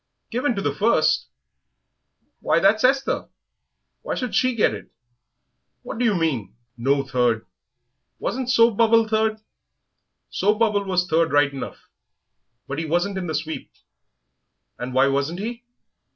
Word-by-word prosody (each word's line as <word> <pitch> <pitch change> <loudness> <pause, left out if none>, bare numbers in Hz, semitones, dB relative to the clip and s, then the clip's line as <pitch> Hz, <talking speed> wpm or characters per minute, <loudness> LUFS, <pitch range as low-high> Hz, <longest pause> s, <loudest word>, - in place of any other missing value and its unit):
"Given 245 +1 0
to 195 - -3
the 145 - 0
first! 155 -4 +2 1.1
Why, - - +2
that's 205 +4 +3
Esther! 270 +2 +1 0.7
Why - - -3
should 250 -4 -4
she 255 -1 +2
get 220 - +2
it?... - - -9 0.9
What 225 - -6
do 245 - +2
you 215 -3 +3
mean? 145 - -1 0.2
No 135 +3 +1
third! 125 -4 0 0.7
Wasn't 255 0 -3
Soap 230 -3 +4
bubble 230 -1 +4
third?" 220 0 +1
"Yes, 215 - -22 0.9
Soap 210 +2 +1
bubble 210 -3 +1
was 180 -2 +1
third 165 -1 +2
right 145 -1 +3
enough, 135 - -8 0.8
but 140 +3 -4
he 165 - -2
wasn't 175 +5 0
in 180 - -4
the 160 - -2
sweep." 155 +1 -4 1.1
"And 125 +1 -5
why 130 +1 +5
wasn't 140 +5 -1
he?" 235 +3 -5
190 Hz, 145 wpm, -23 LUFS, 145-225 Hz, 1.1 s, why